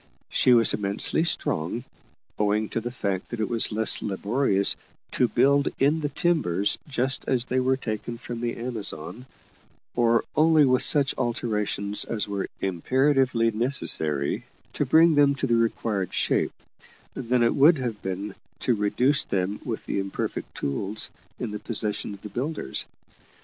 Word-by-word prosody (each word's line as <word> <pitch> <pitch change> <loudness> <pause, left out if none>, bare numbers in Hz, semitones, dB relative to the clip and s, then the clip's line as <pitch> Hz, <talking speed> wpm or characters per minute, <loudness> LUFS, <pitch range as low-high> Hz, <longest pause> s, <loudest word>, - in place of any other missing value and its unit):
She 125 - +3
was 115 -1 +5
immensely 100 +9 0
strong, 115 - -1 0.6
owing 105 +1 +1
to 115 - -2
the 120 - -4
fact 100 -6 -3
that 120 - -5
it 110 - 0
was 115 -2 +1
less 110 +1 +3
laborious 100 0 +2 0.4
to 125 - +2
build 140 +5 +3
in 145 +4 +2
the 150 -2 -2
timbers 135 - +1
just 135 -1 -1
as 125 -2 +2
they 130 +1 0
were 130 +1 +1
taken 115 -1 -5
from 120 0 -7
the 120 -1 -2
Amazon, 115 -1 -5 0.7
or 115 -1 +2
only 155 -1 +5
with 130 -1 +3
such 140 -2 +3
alterations 105 -3 -1
as 110 -3 -2
were 100 -1 -3
imperatively 125 - +1
necessary 90 - 0 0.3
to - - -1
bring 165 +1 +6
them 145 -1 +4
to 135 - -2
the 120 - 0
required 110 -4 -1
shape, - - +1 0.6
than 125 -1 0
it 115 - +3
would 150 +4 +5
have 120 -5 -4
been 95 +2 -4 0.3
to 125 - +2
reduce 125 +7 +2
them 95 +2 -2
with 115 -3 -5
the - - -2
imperfect 95 0 -4
tools 95 +10 -1 0.3
in 120 -4 -4
the 105 - -5
possession 105 -2 -2
of 100 - -18
the 105 - -7
builders. 125 - -3
115 Hz, 155 wpm, -25 LUFS, 105-130 Hz, 0.7 s, bring